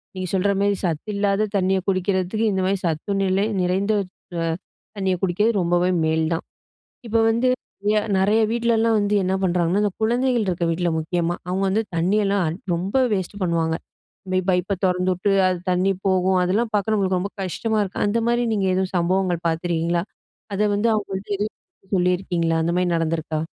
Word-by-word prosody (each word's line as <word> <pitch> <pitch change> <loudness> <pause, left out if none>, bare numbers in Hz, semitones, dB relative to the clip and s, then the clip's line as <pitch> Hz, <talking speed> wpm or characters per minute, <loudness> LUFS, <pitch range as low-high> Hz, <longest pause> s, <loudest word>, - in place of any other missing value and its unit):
நீங்க 185 0 -3
சொல்ற 195 +1 +2
மாரி 200 0 +2
சத்து 170 +4 -2
இல்லாத 200 +1 +1
தண்ணிய 190 0 +2
குடிக்கிறதுக்கு 190 +3 0
இந்த 190 - 0
மாரி 195 +1 +1
சத்து 160 +4 -2
நிலை 190 +2 +1 0.2
நிறைந்த 190 +4 +1 0.5
அ - - 0 0.5
தண்ணிய 190 -2 +1
குடிக்கறது 195 +5 +2
ரொம்பவே 175 +1 +2 0.2
மேல் 160 0 +1
தான். 165 - -3 0.6
இப்போ 225 +1 +1
வந்து 235 +3 +2 0.7
நெறைய 210 +4 +3
வீட்லலாம் 230 -1 +2
வந்து 205 0 0
என்ன 185 +1 0
பண்ணுறாங்கன்னா 180 +2 +1
அந்த 205 -2 0
குழந்தைகள் 240 -1 +1
இருக்க 175 -2 0
வீட்ல 170 +1 0
முக்கியமா. 170 +1 -1
அவங்க 190 +2 -1
வந்து 215 +4 +1
தண்ணியெல்லாம் 195 -1 +1 0.2
ரொம்ப 190 +8 -2 0.2
வேஸ்ட் 195 +2 -4
பண்ணுவாங்க 165 -2 +1 0.6
போய் 185 - +3
பைப்ப 180 +2 +1
தொறந்துட்டு 180 +1 +1 0.2
அது 180 -1 -1
தண்ணி 185 +2 +2 0.2
போகும். 185 0 +3
அதெல்லாம் 215 +6 +1
பார்க்க 210 +1 +1
நம்மளுக்கு 190 -3 +1
ரொம்ப 200 +3 -3
கஷ்டமா 215 +4 -1
இருக்கும். 195 -2 -2
அந்த 225 +3 +1
மாரி 240 0 +2
நீங்க 200 -2 0
எதுவும் 190 0 -1
சம்பவங்கள் 175 0 0
பார்த்துருக்கீங்களா? 170 +1 0 0.5
அத 210 +1 +2
வந்து 225 +3 +2
அவங்கள்ட்ட 200 -1 -3
எதுவும் 210 - -6
சொல்லியிருக்கீங்களா 175 -2 +1
அந்த 170 +1 0
மாரி 180 0 +1
நடந்துருக்கா? 160 -1 -1
190 Hz, 160 wpm, -22 LUFS, 175-205 Hz, 0.7 s, நெறைய